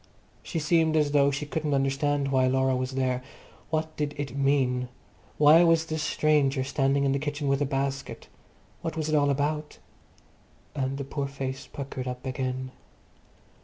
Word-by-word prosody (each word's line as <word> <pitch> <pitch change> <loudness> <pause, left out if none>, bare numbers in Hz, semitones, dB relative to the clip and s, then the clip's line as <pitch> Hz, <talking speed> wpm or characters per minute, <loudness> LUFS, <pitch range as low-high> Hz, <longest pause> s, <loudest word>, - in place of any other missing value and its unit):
She 170 - -5
seemed 160 0 +2
as 150 -2 +2
though 140 -1 +4
she 140 +1 -3
couldn't 150 -1 -1
understand 140 +1 0
why 130 -1 +3
Laura 130 0 +2
was 130 +1 -2
there. 130 -1 0 0.5
What 155 0 -2
did 150 -1 -2
it 140 -3 -4
mean? 135 -3 +1 0.5
Why 155 +3 +7
was 165 -1 +4
this 155 -1 -3
stranger 145 -3 +2
standing 135 +1 +1
in 135 - +2
the 140 - +1
kitchen 145 0 -3
with 140 +1 +1
a 145 - +1
basket? 135 0 -3 0.5
What 165 0 -4
was 155 -1 -1
it 155 - +2
all 145 -1 +3
about? 150 +2 -1 1.0
And 135 -1 -2
the 140 - -3
poor 140 +1 -3
face 135 -1 -5
puckered 135 -2 -6
up 125 +1 -5
again. 130 0 -3
140 Hz, 165 wpm, -27 LUFS, 135-150 Hz, 1.0 s, Why